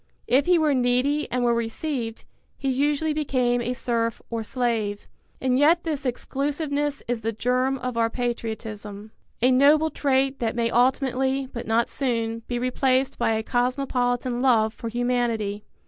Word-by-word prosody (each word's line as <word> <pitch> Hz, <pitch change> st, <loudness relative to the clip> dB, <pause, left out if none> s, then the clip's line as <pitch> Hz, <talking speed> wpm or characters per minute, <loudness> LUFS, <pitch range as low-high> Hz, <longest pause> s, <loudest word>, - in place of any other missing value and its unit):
If 270 Hz, +4 st, +2 dB
he 360 Hz, -1 st, +5 dB
were 310 Hz, -3 st, +3 dB
needy 255 Hz, +4 st, +1 dB
and 250 Hz, 0 st, 0 dB
were 240 Hz, -1 st, +3 dB
received, 235 Hz, +1 st, -3 dB, 0.3 s
he 275 Hz, -, -2 dB
usually 295 Hz, +3 st, +1 dB
became 255 Hz, -5 st, +1 dB
a 245 Hz, +1 st, -2 dB
serf 230 Hz, -2 st, -1 dB
or 230 Hz, -1 st, -2 dB
slave. 220 Hz, -3 st, -2 dB, 0.3 s
And 255 Hz, 0 st, +1 dB
yet 330 Hz, +4 st, +4 dB
this 295 Hz, -4 st, -2 dB
exclusiveness 285 Hz, +3 st, -2 dB
is 240 Hz, -1 st, -2 dB
the 225 Hz, +1 st, -1 dB
germ 250 Hz, +4 st, 0 dB
of 250 Hz, -2 st, -4 dB
our 230 Hz, 0 st, +2 dB
patriotism, 220 Hz, -3 st, -5 dB, 0.3 s
a 255 Hz, -, +5 dB
noble 295 Hz, +4 st, +5 dB
trait 270 Hz, -1 st, +1 dB
that 230 Hz, -1 st, -1 dB
may 230 Hz, -1 st, 0 dB
ultimately, 265 Hz, +2 st, +1 dB
but 235 Hz, -, -6 dB
not 230 Hz, +1 st, +2 dB
soon, 230 Hz, -4 st, -1 dB
be 245 Hz, -, -2 dB
replaced 255 Hz, +1 st, +1 dB
by 225 Hz, -, +2 dB
a 220 Hz, 0 st, -1 dB
cosmopolitan 245 Hz, 0 st, 0 dB
love 225 Hz, -4 st, +3 dB
for 230 Hz, -, -6 dB
humanity. 230 Hz, -4 st, -1 dB
250 Hz, 155 wpm, -24 LUFS, 230-270 Hz, 0.3 s, he